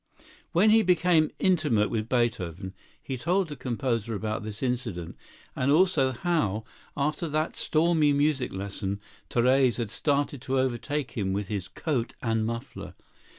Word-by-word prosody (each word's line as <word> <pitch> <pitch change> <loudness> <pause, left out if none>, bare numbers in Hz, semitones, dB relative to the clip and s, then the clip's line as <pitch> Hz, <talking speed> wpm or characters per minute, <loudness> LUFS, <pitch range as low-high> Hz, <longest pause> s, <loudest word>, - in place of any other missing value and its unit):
When 205 +6 +5
he 225 +1 +6
became 175 -4 +3
intimate 150 - +2
with 110 0 -2
Beethoven, 95 -7 -1 0.3
he 130 - -4
told 175 +6 +1
the 145 - -5
composer 115 -4 -2
about 110 +1 -3
this 105 +3 -6
incident, 115 -10 -3 0.4
and 130 +2 +1
also 155 -5 +4
how, 130 - 0 0.3
after 150 +3 -1
that 155 +2 -1
stormy 155 -2 +3
music 145 -2 +1
lesson, 100 +1 -4 0.3
Therese 125 0 +3
had 115 -4 -3
started 145 0 0
to 135 0 -1
overtake 130 +2 -1
him 95 -4 -2
with 100 0 -3
his 100 -4 -3
coat 125 - -2
and 110 -2 +1
muffler. 115 0 -6
130 Hz, 145 wpm, -27 LUFS, 110-155 Hz, 0.4 s, he